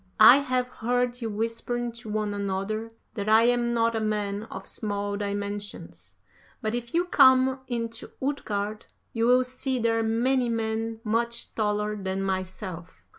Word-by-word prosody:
I 220 +4 +10
have 255 -3 0
heard 245 +1 -1
you 225 - -2
whispering 230 +3 -2
to 230 -1 -9
one 210 -1 -1
another 200 +3 -2 0.2
that 210 -2 -3
I 220 +1 +6
am 240 0 +2
not 230 -1 +2
a - - +1
man 210 -1 -1
of - - -8
small 205 -1 -3
dimensions; 205 0 -5 0.4
but 215 0 -2
if 240 +3 -4
you 350 +1 +3
come 260 -4 +5
into 230 -1 -3
Utgard 215 -6 -3 0.3
you 230 0 +1
will 250 +1 +5
see 255 +1 -2
there 225 -1 +1
many 240 +3 +1
men 225 0 -2
much 235 +1 -1
taller 210 -1 0
than 195 -1 -3
myself. 185 -2 -5
225 Hz, 150 wpm, -27 LUFS, 205-240 Hz, 0.4 s, I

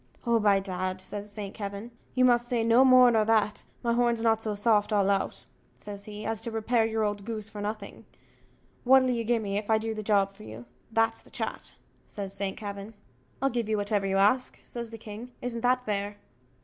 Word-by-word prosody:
"Oh, 235 -1 +3
by 205 -2 +4
dad," 185 -1 -3
says 205 +2 -7
St. 205 -1 -6
Kavin, 200 +2 -6 0.2
"you 255 0 +4
must 240 -1 +3
say 240 -2 0
more 250 +2 +7
nor 220 -2 +3
that 215 -1 +2 0.2
my 235 -1 +2
horn's 235 -1 +1
not 225 -1 +3
so 215 -2 -2
soft 210 0 +2
all 200 -1 +3
out," 195 - -2 0.3
says 200 -1 -9
he, 210 0 -8
"as 225 -1 -2
to 230 - -4
repair 225 +1 +1
your 220 0 -1
old 205 -1 -2
goose 220 -1 -5
for 210 -2 -7
nothing;" 210 0 -6 0.8
"what'll 260 0 +5
you 235 -2 -1
gi' 235 +1 +2
me 205 -2 -2
if 210 - -9
I 220 - +5
do 220 +1 -3
the 215 - -5
job 200 -2 +2
for 200 - -17
you? 115 - -9 0.3
that's 225 0 +1
the - - -17
chat," - - -5 0.3
says 195 -1 -5
St. 195 -1 -2
Kavin. 200 +1 -7 0.5
"I'll 275 - +3
give 235 -2 -2
you 215 - +1
whatever 205 -1 0
you 195 0 +1
ask," 215 +6 +2
says 235 -1 -6
the 225 - -8
king 225 +3 -9
"isn't 235 -2 -4
that 250 +1 +2
fair?" 205 0 -2
215 Hz, 210 wpm, -28 LUFS, 205-235 Hz, 0.8 s, more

